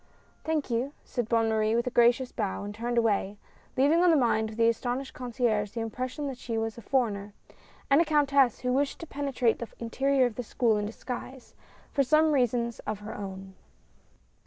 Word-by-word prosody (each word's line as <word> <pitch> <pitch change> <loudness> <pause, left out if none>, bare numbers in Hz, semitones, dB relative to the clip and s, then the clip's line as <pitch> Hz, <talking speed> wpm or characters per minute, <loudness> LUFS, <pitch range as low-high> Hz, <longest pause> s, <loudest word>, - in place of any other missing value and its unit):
"Thank 310 -5 -1
you," 250 +5 -1
said 240 -3 -3
Bonne 230 -1 +3
Marie 220 0 +1
with 235 - +1
a 250 - -2
gracious 240 +2 +3
bow 200 -3 -3
and 205 0 -6
turned 235 +3 -3
away, 205 -3 +1 0.4
leaving 295 +6 +4
on 360 - +6
the 330 - +5
mind 220 -4 +2
of 220 - -9
the 230 0 +3
astonished 245 +3 -1
concierge 235 -4 -1
the 235 - -4
impression 255 +6 -4
that 265 -3 -5
she 230 -1 -3
was 225 0 -2
a 235 - -10
foreigner 210 -5 -1 0.5
and 280 +3 +5
a - - +5
countess 280 -5 +3
who 250 0 0
wished 280 +1 0
to - - -5
penetrate 275 -6 0
the 235 - -5
interior 265 +3 +1
of 235 -3 -3
the 245 - -2
school 225 -1 +1
in 205 0 -2
disguise, 250 +3 -7 0.4
for 280 - +2
some 310 +4 +4
reasons 240 -4 +1
of 215 0 -4
her 210 +1 -7
own. 190 -1 -7
240 Hz, 195 wpm, -28 LUFS, 220-270 Hz, 0.5 s, on